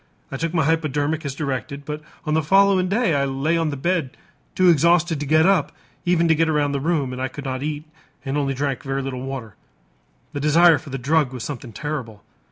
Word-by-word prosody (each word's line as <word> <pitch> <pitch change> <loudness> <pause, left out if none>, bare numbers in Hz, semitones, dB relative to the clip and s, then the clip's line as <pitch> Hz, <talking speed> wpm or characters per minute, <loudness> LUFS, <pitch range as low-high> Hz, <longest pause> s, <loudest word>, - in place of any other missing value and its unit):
I 135 - -4
took 165 +3 -2
my 160 -4 +1
hypodermic 155 0 0
as 135 -1 -4
directed, 140 0 -4
but 150 +1 -5 0.2
on 155 - -1
the 160 - +3
following 195 +3 +4
day 210 -3 +1
I 140 -1 +1
lay 135 +5 0
on 165 -2 +1
the 140 - -4
bed 155 -2 -1 0.4
too 185 - +4
exhausted 170 0 +3
to 145 - -4
get 155 +2 +4
up 190 -6 +3 0.3
even 170 -1 +3
to 160 - +5
get 160 +1 +1
around 150 -2 +1
the 140 - -1
room, 145 -4 -1
and 125 - -5
I 130 - 0
could 140 +2 -9
not 130 -1 -3
eat 150 0 -3 0.4
and 135 +1 -2
only 140 -2 0
drank 140 -1 -2
a - - -12
very 135 0 -1
little 130 -2 -4
water. 130 -5 -6 0.8
The 145 - -3
desire 160 +2 +5
for - - -12
the 135 - -4
drug 145 +1 +1
was 125 -3 -6
something 130 -4 -6
terrible. 115 -5 -5
150 Hz, 225 wpm, -22 LUFS, 135-165 Hz, 0.8 s, to